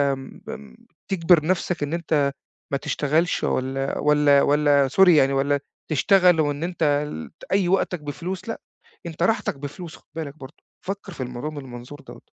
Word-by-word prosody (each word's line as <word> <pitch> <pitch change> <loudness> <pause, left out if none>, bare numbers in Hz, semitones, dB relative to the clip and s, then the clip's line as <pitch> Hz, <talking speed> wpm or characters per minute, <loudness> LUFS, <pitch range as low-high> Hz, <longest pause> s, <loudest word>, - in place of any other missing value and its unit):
م 135 0 -11
أنت 65 -3 -9 0.4
تِجبِر 170 -3 +4
نفسك 180 -2 0
إن 145 +2 -3
أنت 155 -4 +1 0.4
ما 140 - +1
تشتغلش، 155 +5 0
والّا 135 +1 -1
والّا 150 -1 +4
والّا 145 -1 +3
sorry 190 +7 +5
يعني، 140 -5 +5
والّا 140 +1 +1 0.3
تشتغل، 180 +2 +4
وإن 145 0 -1
أنت 150 -4 +1 0.3
ت - - -18
أي 195 -2 +2
وقتك 180 -3 +1
بفلوس. 170 +7 -6
لأ، 225 - -5 0.4
أنت 170 0 -4
راحتك 225 -4 +1
بفلوس. 155 +4 -8
خد - - -27
بالك 155 -3 -6
برضه، 140 +1 -11 0.3
فكّر 195 0 -5
في 135 - -5
الموضوع 125 +4 -5
من 155 - -9
المنظور 125 +2 -10
دوّة. - - -13
150 Hz, 165 wpm, -23 LUFS, 140-175 Hz, 0.4 s, sorry